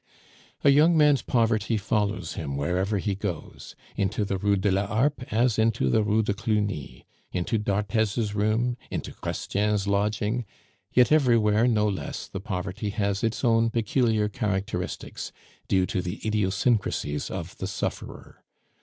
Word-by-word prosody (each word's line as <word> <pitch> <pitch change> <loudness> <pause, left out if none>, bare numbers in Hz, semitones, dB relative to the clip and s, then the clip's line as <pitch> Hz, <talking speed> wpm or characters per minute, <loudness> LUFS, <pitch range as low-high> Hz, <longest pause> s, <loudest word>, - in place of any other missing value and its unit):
A 140 - +7
young 160 +4 +5
man's 150 -3 +5
poverty 115 -2 +1
follows 100 -3 -1
him 70 -3 -4
wherever 90 +8 0
he 100 +1 -1
goes 95 -5 -6 0.2
into 100 +2 0
the 95 -1 -2
Rue 100 +1 +2
de 100 +1 +1
la 100 +2 +1
Harpe 125 +5 0
as 115 +1 +2
into 110 - +2
the 110 - +4
Rue 110 +1 +2
de 100 - 0
Cluny, 105 -7 -2 0.3
into 90 +5 -1
d'Arthez's 105 +1 0
room, 110 +4 +1
into - - -4
Chrestien's 105 0 -1
lodging; 105 +3 0 0.5
yet 125 +2 +4
everywhere 115 -6 +4
no 105 -3 +2
less 100 -3 -4
the 95 - -6
poverty 95 +1 -3
has 100 -1 -1
its 115 +3 -1
own 115 -1 +3
peculiar 115 -2 +1
characteristics, 100 -3 -3 0.4
due 95 -1 +3
to 90 - -2
the 90 -1 -5
idiosyncrasies 100 - 0
of 85 +2 -6
the 95 - -3
sufferer. 100 - -5
105 Hz, 145 wpm, -26 LUFS, 95-115 Hz, 0.5 s, A